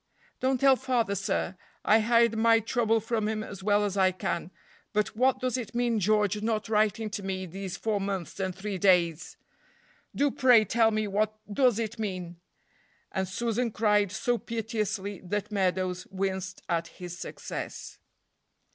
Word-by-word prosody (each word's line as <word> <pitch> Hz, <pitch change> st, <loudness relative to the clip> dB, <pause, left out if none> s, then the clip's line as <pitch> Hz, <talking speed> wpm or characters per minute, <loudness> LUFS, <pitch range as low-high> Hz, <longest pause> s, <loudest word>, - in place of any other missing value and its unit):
"Don't 260 Hz, 0 st, +1 dB
tell 270 Hz, 0 st, +6 dB
father, 245 Hz, -6 st, 0 dB
sir; 195 Hz, -1 st, -1 dB, 0.3 s
I 215 Hz, +2 st, +6 dB
hide 230 Hz, 0 st, +3 dB
my 225 Hz, 0 st, +5 dB
trouble 225 Hz, 0 st, +1 dB
from 220 Hz, -1 st, -1 dB
him 215 Hz, 0 st, -2 dB
as 200 Hz, -3 st, -8 dB
well 205 Hz, +1 st, +2 dB
as 200 Hz, -1 st, -3 dB
I 190 Hz, -1 st, +4 dB
can, 175 Hz, -1 st, -3 dB, 0.4 s
but 210 Hz, 0 st, 0 dB
what 260 Hz, +3 st, +3 dB
does 255 Hz, -1 st, -1 dB
it 235 Hz, -2 st, -6 dB
mean 240 Hz, -2 st, +1 dB
George 210 Hz, +1 st, +2 dB
not 220 Hz, -1 st, -1 dB
writing 215 Hz, 0 st, +1 dB
to 205 Hz, -, -4 dB
me 190 Hz, -1 st, -3 dB
these 190 Hz, +1 st, -6 dB
four 210 Hz, -1 st, -1 dB
months 195 Hz, -2 st, -4 dB
and 190 Hz, -2 st, -2 dB
three 195 Hz, 0 st, -4 dB
days? 175 Hz, -4 st, +2 dB, 0.8 s
Do 285 Hz, 0 st, +2 dB
pray 250 Hz, -5 st, +5 dB
tell 225 Hz, +2 st, +3 dB
me 215 Hz, -1 st, -1 dB
what 210 Hz, +2 st, 0 dB, 0.2 s
does 250 Hz, -3 st, +3 dB
it 225 Hz, 0 st, -3 dB
mean!" 185 Hz, -5 st, -4 dB, 0.7 s
and 190 Hz, 0 st, -1 dB
Susan 235 Hz, +5 st, -1 dB
cried 210 Hz, -2 st, +2 dB
so 240 Hz, +4 st, 0 dB
piteously 215 Hz, -4 st, -3 dB
that 205 Hz, +3 st, -3 dB
Meadows 185 Hz, -2 st, -1 dB
winced 190 Hz, -1 st, -3 dB
at 170 Hz, -1 st, 0 dB
his 175 Hz, +1 st, -9 dB
success. -, -, -7 dB
210 Hz, 160 wpm, -28 LUFS, 190-230 Hz, 0.8 s, tell